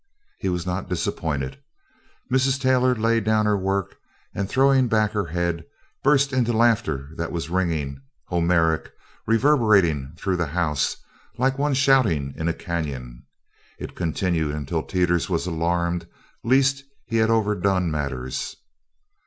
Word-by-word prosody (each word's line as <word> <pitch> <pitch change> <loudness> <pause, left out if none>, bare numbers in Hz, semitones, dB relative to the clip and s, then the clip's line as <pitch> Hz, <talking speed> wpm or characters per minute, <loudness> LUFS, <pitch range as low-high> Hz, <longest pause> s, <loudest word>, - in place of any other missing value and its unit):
He 95 - -1
was 90 -1 -2
not 90 +1 -3
disappointed. 75 -6 -2 0.7
Mrs. 130 +1 +2
Taylor 130 -1 +3
laid 115 0 +1
down 110 0 +2
her 105 -1 +3
work 95 -1 -2 0.4
and, 100 0 -3
throwing 135 0 +4
back 110 -2 +2
her 105 -3 -1
head, 85 0 -2 0.4
burst 135 -1 +3
into 120 -2 +1
laughter 110 - +1
that 85 0 -3
was 85 -1 -4
ringing, 80 -7 -1 0.2
Homeric, 85 -2 +1 0.4
reverberating 105 - +3
through 95 0 -1
the 85 -2 -1
house 75 -3 0 0.4
like 130 +2 +2
some 135 - -5
one 145 -1 +1
shouting 115 - +3
in 80 - -3
a 85 - +1
canyon. 65 -8 -5 0.5
It - - -7
continued 80 -2 -1
until 75 +2 -2
Teeters 90 -1 0
was 85 -2 0
alarmed 85 0 -1 0.4
lest 135 +3 +3 0.2
he 115 - -1
had 110 0 +3
overdone 100 -5 +1
matters. 70 -4 -3
90 Hz, 135 wpm, -23 LUFS, 80-115 Hz, 0.7 s, throwing